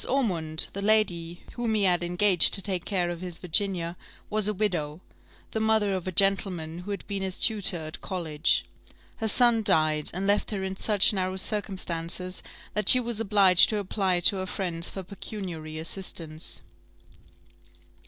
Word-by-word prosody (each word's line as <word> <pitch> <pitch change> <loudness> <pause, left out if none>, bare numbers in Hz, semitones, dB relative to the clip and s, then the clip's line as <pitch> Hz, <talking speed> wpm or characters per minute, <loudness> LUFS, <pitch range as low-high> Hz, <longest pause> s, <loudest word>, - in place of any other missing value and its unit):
Ormond, 170 - 0
the 200 - -5
lady 180 -5 0
whom 235 -2 -2
he 210 - +1
had 180 -2 +2
engaged 175 0 +4
to 195 - 0
take 185 -3 -3
care 180 -4 -1
of 170 0 -7
his 180 -2 -7
Virginia, 180 -1 0 0.4
was 215 -1 +1
a 210 - 0
widow, 170 -7 -2 0.5
the 220 - -2
mother 220 -2 +1
of 185 -1 -4
a - - -2
gentleman 180 -3 +1
who 180 +3 -9
had 200 - -5
been 200 -1 -4
his 190 -1 -3
tutor 205 -5 +3
at 155 -1 -7
college. 160 -5 -1 0.5
Her 225 - -2
son 235 +1 +4
died, 155 -6 +2
and 185 +3 -3
left 205 +1 +1
her 200 -3 -4
in 190 0 -4
such 205 +1 +3
narrow 185 -1 -2
circumstances, 185 -3 -1 0.3
that 210 -2 0
she 255 - +8
was 235 -3 -2
obliged 200 -4 +5
to 215 - -1
apply 190 -3 -1
to 195 - +6
her 185 0 -4
friends 175 -3 -4
for 190 - -7
pecuniary 180 -5 -7
assistance. 160 -2 -4
190 Hz, 165 wpm, -26 LUFS, 170-205 Hz, 0.5 s, she